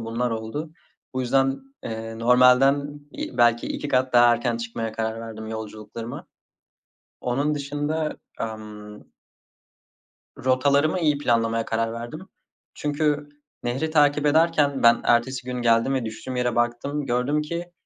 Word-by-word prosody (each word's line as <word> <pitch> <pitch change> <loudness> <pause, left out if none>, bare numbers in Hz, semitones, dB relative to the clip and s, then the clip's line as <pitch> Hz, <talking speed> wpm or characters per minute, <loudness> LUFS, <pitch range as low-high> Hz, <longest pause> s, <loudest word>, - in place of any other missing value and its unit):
bunlar 115 +2 -2
oldu. 115 +8 -4 0.4
Bu 130 - -1
yüzden, 135 +2 +1 0.2
eee, 115 0 -5
normalden 130 +4 +4
i - - -6
belki 120 0 +4
2 145 - -4
kat 130 -1 +1
daha 120 0 +7
erken 120 0 0
çıkmaya 115 -1 -4
karar 110 0 -3
verdim 110 -1 -7
yolculuklarıma. 110 +1 -7 0.9
Onun 140 +5 0
dışında 145 +2 -2 0.2
amm 105 -1 -7 1.4
Rotalarımı 140 +6 +3
iyi 150 -3 +2
planlamaya 115 -4 +1
karar 115 0 -1
verdim. 120 +7 -6 0.5
Çünkü 150 0 -1 0.3
nehri 130 +6 -2
takip 150 -1 +3
ederken 150 -2 +3
ben 115 0 +6
ertesi 125 +2 +2
gün 125 -1 -3
geldim 115 +3 +3
ve 130 -3 -1
düştüğüm 115 +3 -6
yere 125 -1 0
baktım. 120 +5 -1
Gördüm 125 +5 +1
ki 170 +3 -5
125 Hz, 130 wpm, -24 LUFS, 115-145 Hz, 1.4 s, daha